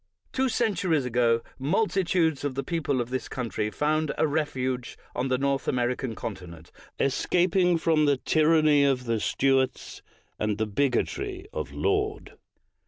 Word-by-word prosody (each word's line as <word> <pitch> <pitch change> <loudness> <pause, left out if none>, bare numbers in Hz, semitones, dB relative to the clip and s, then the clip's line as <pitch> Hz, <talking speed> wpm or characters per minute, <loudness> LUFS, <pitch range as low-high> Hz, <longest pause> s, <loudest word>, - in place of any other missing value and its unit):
Two 265 0 +1
centuries 190 - +1
ago, 115 -1 +2 0.2
multitudes 170 -1 +1
of 145 -3 -2
the 135 - -2
people 145 -4 -1
of 120 0 -3
this 130 -1 -3
country 115 -4 -3
found 155 +4 0
a - - +3
refuge 130 -5 -2 0.2
on 130 - -1
the 130 -1 +1
North 140 0 -1
Ameri 125 0 +1
can 120 -4 -5
continent, 90 -7 -8 0.3
escaping 180 +5 +2
from 160 -2 +2
the 140 -2 +3
tyranny 155 0 +3
of 135 -2 +2
the 115 -2 -1
Stuarts 135 +3 0 0.4
and 105 0 0
from - - -6
the 110 - 0
bigotry 145 - -1
of - - -4
Laud. 415 +1 -1
140 Hz, 150 wpm, -26 LUFS, 125-165 Hz, 0.4 s, a